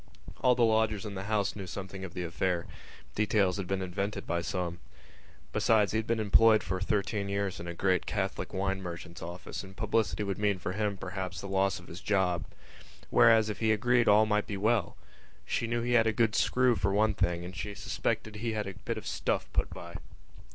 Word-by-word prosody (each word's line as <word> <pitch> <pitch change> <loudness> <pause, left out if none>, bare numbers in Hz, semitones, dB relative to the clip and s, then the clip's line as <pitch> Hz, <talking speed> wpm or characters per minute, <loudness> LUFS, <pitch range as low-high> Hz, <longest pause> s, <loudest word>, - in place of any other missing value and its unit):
All 125 -1 +5
the 120 -1 +4
lodgers 110 -1 +1
in 105 - -5
the 95 0 -5
house 105 -2 0
knew 100 -3 -6
something 95 0 -6
of 95 -2 -7
the 90 - -2
affair; 85 0 -1 0.5
details 105 -3 +2
had 95 -3 -4
been 95 0 -1
invented 100 +3 -3
by 85 0 -1
some. 85 -1 -3 0.7
Besides, 110 -3 +3
he 110 - +1
had 110 - -5
been 115 -1 +1
employed 110 +1 +5
for 95 +1 -3
thirteen 100 0 -1
years 100 -1 -1
in 85 - -7
a 85 - -5
great 95 -1 +1
Catholic 95 -2 -2
wine 95 0 -1
merchant's 85 -1 -7
office 85 +4 -6
and 95 0 -12
publicity 110 -2 0
would 100 -1 -3
mean 105 -2 +2
for 90 - -4
him, 105 0 -1
perhaps, 95 0 -5
the 100 - -6
loss 95 0 +1
of 85 - -14
his 85 +3 -9
job. 95 -4 +1 0.7
Whereas 115 -2 +6
if 105 - -4
he 110 -1 +2
agreed 120 +2 +3
all 105 +1 +6
might 105 -1 +1
be 100 - -3
well. 110 -1 +1 0.5
She 115 - -1
knew 120 0 -1
he 120 - -1
had 115 -2 +5
a 110 - +2
good 110 0 +2
screw 125 0 +3
for 95 -1 0
one 105 +2 +3
thing 85 -3 0
and 90 +2 -8
she 105 0 -5
suspected 110 +1 -2
he 115 +1 -2
had 105 -1 -2
a 95 - -5
bit 90 -2 -5
of - - -7
stuff - - -2
put - - +1
by. - - -8
100 Hz, 215 wpm, -30 LUFS, 95-110 Hz, 0.7 s, Whereas